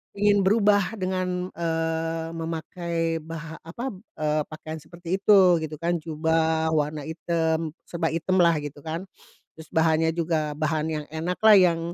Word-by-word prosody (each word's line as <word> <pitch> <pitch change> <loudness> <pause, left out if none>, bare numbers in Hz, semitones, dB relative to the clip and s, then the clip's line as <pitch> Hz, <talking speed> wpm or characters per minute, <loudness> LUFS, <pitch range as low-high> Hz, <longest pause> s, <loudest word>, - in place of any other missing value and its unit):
ingin 205 -1 +3
berubah 205 -1 +3
dengan, 185 -1 -2
eee, 165 0 -2
memakai 165 0 -3
bah 165 0 -7
apa, 235 +10 -5 0.3
eee, 155 0 +1
pakaian 155 0 -7
seperti 170 +4 -4
itu 190 -4 +6
gitu 155 0 -5
kan. 175 +1 +1
Jubah 160 0 +1
warna 150 -1 0
item, 160 0 -1
serba 165 -1 -1
item 185 +3 0
lah 170 -1 +5
gitu 145 0 -7
kan. 165 +3 -3 0.5
Terus 160 0 -11
bahannya 160 0 +3
juga 160 -3 0
bahan 155 0 0
yang 150 -1 -3
enak 165 +3 -3
lah 215 -1 +9
yang, 175 -3 +4
165 Hz, 145 wpm, -25 LUFS, 160-180 Hz, 0.5 s, lah